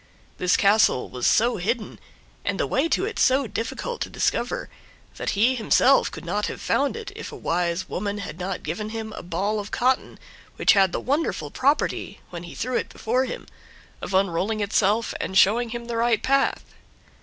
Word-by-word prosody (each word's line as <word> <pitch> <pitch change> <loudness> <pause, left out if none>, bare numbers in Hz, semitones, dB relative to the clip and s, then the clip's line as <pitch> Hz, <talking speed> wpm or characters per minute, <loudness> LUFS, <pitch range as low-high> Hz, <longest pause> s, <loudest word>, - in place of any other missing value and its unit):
This 180 0 +3
castle 200 -9 +3
was 125 -1 -1
so 235 +1 +3
hidden, 215 +4 -2 0.4
and - - -2
the - - +2
way 330 - +1
to 380 - +1
it 450 - -4
so 265 +1 +4
difficult 235 - -4
to - - -2
discover, - - -1 0.5
that - - -2
he 235 +5 +4
himself 255 +3 +4
could - - -9
not 210 +1 -1
have - - -6
found 280 +9 0
it 440 -3 -7
if 450 - -7
a - - -8
wise 175 - -1
woman 205 +1 -3
had 195 -4 -7
not 185 +1 -4
given 180 +8 -4
him 220 -1 -5
a - - -7
ball 200 +4 -1
of 205 0 -6
cotton 255 +2 0 0.4
which - - +5
had 195 -3 +4
the - - -2
wonderful 290 +5 -1
property, 285 +3 0
when 170 -1 -6
he 175 - -10
threw 255 +1 -2
it - - -3
before 250 +4 0
him, 250 - -6 0.6
of 190 - -3
unrolling 195 +3 +1
itself 210 +2 +1
and 190 - -1
showing 230 +5 +4
him 235 +1 -5
the 235 -1 -3
right 230 -1 +2
path. 275 +1 +2
220 Hz, 190 wpm, -24 LUFS, 195-255 Hz, 0.6 s, which